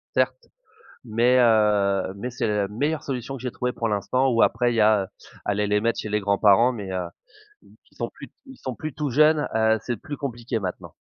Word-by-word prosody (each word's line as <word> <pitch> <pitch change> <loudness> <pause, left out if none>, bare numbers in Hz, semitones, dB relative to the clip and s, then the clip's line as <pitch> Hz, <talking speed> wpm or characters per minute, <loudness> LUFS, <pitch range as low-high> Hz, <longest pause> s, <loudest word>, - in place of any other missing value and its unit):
certes, 470 - 0 0.6
mais, 120 +2 +3
heu, 105 -5 +3
mais 120 +5 -5
c'est 120 - -2
la 105 -2 0
meilleure 145 +9 -2
solution 135 0 -4
que 125 - -11
j'ai 125 - -3
trouvé 125 +1 -3
pour 115 - -2
l'instant. 120 +6 +1
Ou 115 -2 +3
après, 120 -1 +2
il - - -2
y - - +3
a 105 -3 +3 0.4
aller 105 0 0
les 105 0 +1
mettre 115 +1 0
chez 105 - -6
les 105 +1 +1
grands-parents 100 +4 +4
mais, 100 -5 -6
heu, 90 -1 -2 0.8
qui - - -28
sont - - -3
plus - - -12 0.2
ils 265 -1 -13
sont 130 - -5
plus 155 +5 -6
tout 150 -1 -2
jeunes, 150 +3 +4
heu, 110 0 +3
c'est 120 - -3
plus 145 +7 -7
compliqué, 120 -4 -3
maintenant. 90 -2 -6
115 Hz, 210 wpm, -24 LUFS, 105-130 Hz, 0.8 s, grands-parents